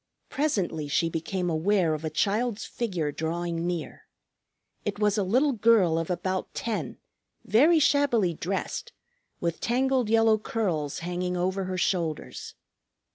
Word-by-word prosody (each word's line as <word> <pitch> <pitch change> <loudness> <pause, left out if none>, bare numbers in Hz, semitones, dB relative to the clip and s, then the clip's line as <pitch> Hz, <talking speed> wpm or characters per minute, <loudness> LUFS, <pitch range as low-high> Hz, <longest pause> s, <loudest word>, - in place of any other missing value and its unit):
Presently 190 - -1
she 165 +3 +1
became 175 +3 -2
aware 170 +1 +2
of 155 0 -4
a 160 - -1
child's 210 +8 0
figure 180 -11 -2
drawing 170 +2 -2
near. 175 -2 -5 0.8
It 205 -1 -3
was 210 -1 +2
a 210 - +1
little 255 +10 +3
girl 210 -8 +4
of 165 - -4
about 185 +1 -2
ten, 230 -2 -3 0.5
very 300 +10 +5
shabbily 275 - +3
dressed, 195 - -4 0.5
with 170 -1 -2
tangled 255 -1 +1
yellow 225 -1 +4
curls 185 - -2
hanging 180 0 -2
over 190 +2 -1
her 185 0 -3
shoulders. 170 -4 -2
185 Hz, 130 wpm, -27 LUFS, 170-225 Hz, 0.8 s, very